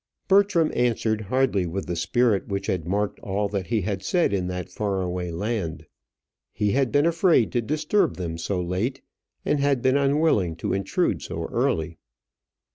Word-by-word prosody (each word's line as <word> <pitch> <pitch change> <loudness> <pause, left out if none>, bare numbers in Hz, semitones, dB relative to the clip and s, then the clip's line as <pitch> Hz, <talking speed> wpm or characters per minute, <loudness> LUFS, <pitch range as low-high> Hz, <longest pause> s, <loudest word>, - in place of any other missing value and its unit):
Bertram 195 -5 +4
answered 115 -3 +1
hardly 110 -4 +1
with 95 +3 -4
the 90 - -3
spirit 110 +4 +1
which 100 0 -3
had 90 -5 -2
marked 100 +2 -1
all 100 +1 -1
that 100 -4 -3
he 110 +2 0
had 95 0 -3
said 170 - +1
in 90 -2 0
that 90 0 -5
far 100 0 -2
away 90 0 -3
land. 85 -3 -3 0.7
"He 105 -1 0
had 130 0 +1
been 145 +1 +3
afraid 165 - +3
to 120 - +1
disturb 155 - +1
them 85 -2 -4
so 90 +3 -2
late; 90 +9 -2 0.4
and 150 - +1
had 140 -3 +1
been 130 +1 +4
unwilling 140 - +2
to - - -3
intrude 95 0 0
so - - -5
early." 80 0 -1
105 Hz, 170 wpm, -24 LUFS, 90-135 Hz, 0.7 s, Bertram